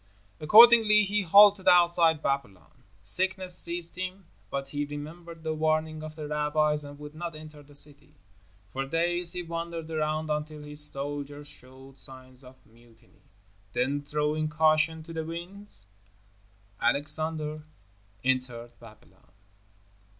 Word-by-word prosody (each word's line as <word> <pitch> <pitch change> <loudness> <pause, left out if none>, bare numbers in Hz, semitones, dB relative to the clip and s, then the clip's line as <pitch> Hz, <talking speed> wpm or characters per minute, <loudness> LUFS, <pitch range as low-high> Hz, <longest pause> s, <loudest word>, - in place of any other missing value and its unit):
Accordingly, 215 +4 +7
he 205 +1 0
halted 200 +2 +6
outside 170 -3 +4
Babylon. 125 - -4 0.2
Sickness 185 -1 +1
seized 170 -1 +1
him, 185 +1 -6 0.2
but 135 +2 -4
he 145 +1 -2
remembered 160 +3 -9
the 160 0 -2
warning 155 0 -1
of 155 0 -8
the 155 -2 -6
rabbis 150 0 0
and 145 0 -10
would 150 0 -10
not 165 +1 -6
enter 155 -1 -11
the 145 0 -18
city. 145 +1 -1 0.6
For 135 - -3
days 170 +3 0
he 180 0 -4
wandered 165 -1 -6
around 155 0 -2
until 150 0 -4
his 150 0 +2
soldiers 145 0 -4
showed 130 +1 -12
signs 130 0 -9
of 130 0 -14
mutiny. 115 0 -24 0.5
Then, 140 +3 0
throwing 150 +1 -1
caution 155 +1 +2
to 165 +1 -10
the 160 -1 -3
winds, 170 - -8 0.9
Alexander 150 +4 0 0.6
entered 125 -2 -1
Babylon. 115 -2 -18
155 Hz, 130 wpm, -27 LUFS, 145-170 Hz, 0.9 s, Accordingly